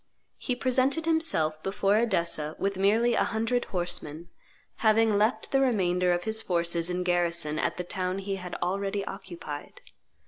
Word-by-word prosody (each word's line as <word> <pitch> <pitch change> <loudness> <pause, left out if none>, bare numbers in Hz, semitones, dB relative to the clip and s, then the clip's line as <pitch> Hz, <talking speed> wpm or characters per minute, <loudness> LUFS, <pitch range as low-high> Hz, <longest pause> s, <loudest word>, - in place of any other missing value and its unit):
He 250 - -1
presented 260 +5 +1
himself 320 - +1
before 195 +2 +1
Edessa 170 -8 0
with 195 0 -1
merely 220 +5 +3
a - - +3
hundred 230 +2 0
horsemen, 175 -3 -3 0.5
having 220 -1 +3
left 215 +4 +1
the 270 - +3
remainder 180 -8 +2
of 175 0 0
his 220 0 -2
forces 170 -2 0
in 180 0 -1
garrison 170 -3 0
at - - -1
the 180 - -2
town 185 +1 -2
he 195 0 -3
had 180 -1 -7
already 195 +2 -1
occupied. 175 -7 -8
195 Hz, 150 wpm, -28 LUFS, 175-220 Hz, 0.5 s, merely